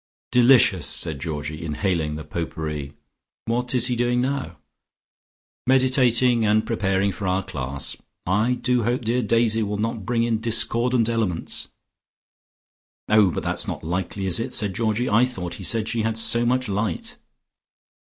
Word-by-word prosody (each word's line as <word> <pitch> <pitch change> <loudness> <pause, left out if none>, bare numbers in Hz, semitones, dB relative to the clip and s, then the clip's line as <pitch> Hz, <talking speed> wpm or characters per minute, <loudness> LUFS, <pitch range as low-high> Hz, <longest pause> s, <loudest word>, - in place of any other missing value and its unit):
"Delicious!" 120 - +5
said 75 -3 -2
Georgie, 75 +1 -5
inhaling 80 -1 -1
the 80 - -6
pot 80 +2 -4
pourri. 75 -3 -5 0.5
"What 120 +2 0
is 125 -1 +3
he 125 0 +1
doing 120 +1 +1
now?" 135 +2 -2 1.1
"Meditating, 125 -2 +3
and 110 +1 +2
preparing 100 -3 0
for 95 +1 -5
our 95 +1 0
class. 70 -6 -2 0.3
I 105 +7 +1
do 125 0 0
hope 120 +2 -1
dear 120 +3 +1
Daisy 115 0 +2
will 105 -1 -2
not 110 0 -3
bring 115 +3 0
in 115 -2 0
discordant 115 +1 +1
elements." 110 -8 -2 1.4
"Oh, 105 -3 +5
but - - -4
that's - - -1
not - - -5
likely, 90 +4 -3
is 95 0 +3
it?" 125 +2 -3
said 105 -3 0
Georgie. 110 +3 -1
"I 115 +3 +4
thought 95 -9 -3
he - - -6
said 110 +3 +1
she 115 -1 -1
had 110 0 -1
so 115 +1 +3
much 130 +1 +1
light." 100 -3 -3
110 Hz, 155 wpm, -23 LUFS, 95-120 Hz, 1.4 s, Delicious